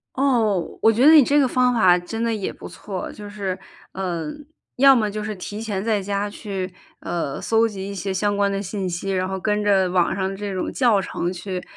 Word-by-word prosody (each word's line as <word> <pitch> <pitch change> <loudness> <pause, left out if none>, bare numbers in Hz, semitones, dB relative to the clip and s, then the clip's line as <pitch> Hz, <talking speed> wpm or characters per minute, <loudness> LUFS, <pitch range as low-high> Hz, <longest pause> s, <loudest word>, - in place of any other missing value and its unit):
哦， 230 -10 +1
我 225 - +6
觉 240 +5 +2
得 315 - +9
你 305 -3 +9
这 285 +4 +3
个 275 - +4
方 250 0 +2
法 185 -5 +5
真 225 +6 -5
的 230 -1 0
也 200 -3 -3
不 - - -11
错， 190 -3 -6
就 210 -1 -9
是， 195 -3 -3 0.4
呃， 170 -5 -3 0.4
要 270 0 +7
么 215 -2 +1
就 210 +1 -4
是 215 0 -4
提 205 +3 -6
前 205 -3 -3
在 215 -3 +1
家 200 +1 -2
去， 195 -3 -5 0.3
呃， 165 -5 -3
搜 225 0 +2
集 195 -2 -6
一 200 - -5
些 195 +1 -3
相 205 +2 0
关 200 0 +2
的 195 0 -2
信 195 -1 -3
息， 175 +3 -3
然 185 0 0
后 190 0 -3
跟 210 +2 0
着 195 -2 +3
网 180 -1 +2
上 190 -1 -1
的 195 - -6
这 205 0 -4
种 185 - -3
教 235 -6 +3
程 180 -1 -3
去， 180 0 -5
200 Hz, 245 characters per minute, -22 LUFS, 185-220 Hz, 0.4 s, 得